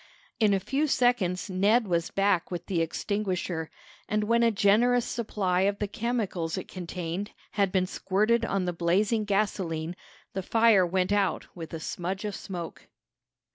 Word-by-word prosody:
In 215 -3 +4
a - - +1
few 275 +10 0
seconds 245 -10 +1
Ned 205 +4 +2
was 170 -2 0
back 195 -3 +1
with 175 -1 -5
the 180 -4 0
extinguisher, 180 -2 -2 0.4
and 215 0 +1
when 230 +2 +2
a 235 - +5
generous 230 +4 +3
supply 195 -6 -1
of 200 - -4
the 205 - -2
chemicals 205 -7 -2
it 185 - -5
contained 180 +2 -5 0.2
had 200 -2 +1
been 185 -1 +2
squirted 215 +5 +1
on 195 -4 0
the 180 - -1
blazing 200 +6 +1
gasoline, 185 -5 -1 0.4
the 190 - -2
fire 220 -2 +4
went 185 +2 0
out 200 -2 +1
with 165 -3 -7
a 165 - -5
smudge 185 +5 -4
of 205 - -3
smoke. 175 -4 -7
195 Hz, 160 wpm, -28 LUFS, 180-215 Hz, 0.4 s, a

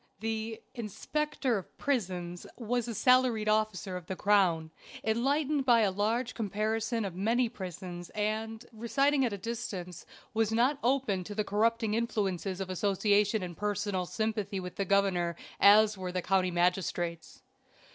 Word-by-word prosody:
The 220 +1 -3
"Inspector 260 +2 -2
of 185 - -14
Prisons" 180 -9 -2
was 240 0 -1
a 230 - -4
salaried 250 -1 +3
officer 215 -4 0
of 180 -2 -7
the 190 - -3
crown, 180 -6 +2 0.3
enlightened 275 +6 +1
by 240 -3 +5
a 205 -3 +3
large 225 +5 0
comparison 220 +1 -1
of 190 - -4
many 230 +7 +1
prisons, 180 -3 -7
and, 220 +1 -2
residing 275 +5 +2
at 235 - -1
a - - -3
distance, 195 -5 -5 0.3
was 225 -1 +1
not 250 +6 +2
open 245 -7 +1
to 205 - -7
the 215 - +1
corrupting 220 +2 +1
influences 195 -5 -1
of 190 -1 -4
association 205 +2 +2
and 175 -2 -6
personal 205 -3 -1
sympathy 210 -2 -2
with 180 -1 -7
the 200 - 0
governor, 185 -3 +2 0.2
as 210 0 +6
were 185 -1 -3
the 180 -1 -2
county 190 -1 +2
magistrates. 175 -2 -1
210 Hz, 145 wpm, -30 LUFS, 185-230 Hz, 0.3 s, as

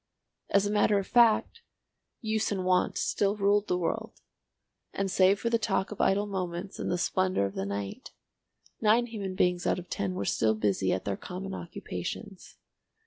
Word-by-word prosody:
As 200 0 +3
a 205 - -1
matter 210 0 +3
of 200 - -1
fact, 235 - +3 0.6
use 220 -2 0
and 190 -2 -2
wont 185 0 +2
still 200 0 +1
ruled 205 0 +2
the 180 - +1
world, 175 - -3 0.8
and 195 -1 -1
save 190 +1 +4
for 230 - -1
the 230 - +3
talk 200 -2 0
of 210 - -3
idle 200 +2 +3
moments 185 -1 -4
and - - -2
the 180 - +1
splendour 185 - +1
of 100 - -4
the 95 - -3
night, 100 0 -5 0.7
nine 225 +2 +4
human 205 -5 -5
beings 180 -2 +1
out - - +2
of 180 0 -9
ten 95 -2 -2
were 100 +2 -3
still 110 +2 +2
busy 100 -3 +1
at 95 - -2
their 100 -1 -2
common 190 +2 -6
occupations. 175 - -7
190 Hz, 180 wpm, -29 LUFS, 170-205 Hz, 0.8 s, save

